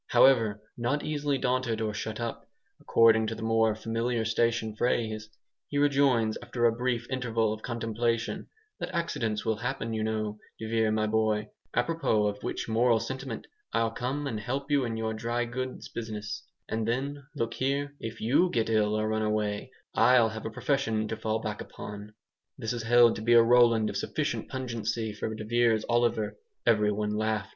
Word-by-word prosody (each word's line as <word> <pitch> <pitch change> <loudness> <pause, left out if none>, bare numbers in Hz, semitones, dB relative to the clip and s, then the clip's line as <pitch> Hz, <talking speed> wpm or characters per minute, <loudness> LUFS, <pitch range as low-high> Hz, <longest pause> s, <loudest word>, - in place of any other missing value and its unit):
However, 115 -6 +4
not 120 +5 -1
easily 145 -2 0
daunted 125 -3 0
or 110 -1 -1
"shut 110 +1 -4
up," 115 -1 -5 0.3
according 110 -1 +4
to 115 - -3
the 110 - -7
more 110 -1 +3
familiar 115 +1 -1
station 115 -1 +1
phrase, 110 -2 -1 0.4
he 145 - -3
rejoins, 140 -6 +3
after 120 -1 -1
a 115 - +6
brief 120 0 -1
interval 115 -4 0
of 110 - -8
contemplation, 115 0 -2 0.3
"that - - -3
accidents 115 -10 -1
will 110 -1 +1
happen, 120 -1 -3
you 110 -1 -1
know, 110 -1 -2 0.2
de 110 - -6
Vere, 110 -1 +2
my 110 0 +1
boy 110 -1 +1 0.3
apropos 125 -6 +2
of 105 0 -2
which - - -3
moral 115 +1 +3
sentiment, 130 +1 -5 0.3
I'll 115 0 +2
come 130 +5 -3
and 115 -6 -2
help 135 +7 -3
you 140 -3 +3
in 115 -1 -3
your 110 0 -1
dry 120 +2 -1
goods 130 +2 -5
business; 105 -3 -5 0.2
and 110 0 -2
then, 140 +4 -2
look 115 -4 -1
here, 140 +2 -1
if 115 0 -6
YOU 140 +11 +3
get 115 -6 0
ill 105 -1 +2
or 110 - 0
run 110 0 0
away, 105 +2 -1 0.2
I'll 125 -3 +5
have 110 0 -5
a - - -3
profession 115 -3 0
to 110 - -2
fall 110 0 -1
back 105 -1 -3
upon." 105 +1 -9 0.4
This 110 +1 -2
is 120 - -3
held 120 0 +5
to - - -6
be 120 +2 +3
a 115 -1 +8
Roland 115 -2 +5
of - - -3
sufficient - - -2
pungency 115 -3 -3
for 110 +1 -4
de 110 - -6
Vere's 115 -1 +2
Oliver. 120 -2 +1 0.3
Everyone 105 -1 +2
laughed. 110 -1 -1
115 Hz, 180 wpm, -29 LUFS, 110-125 Hz, 0.4 s, a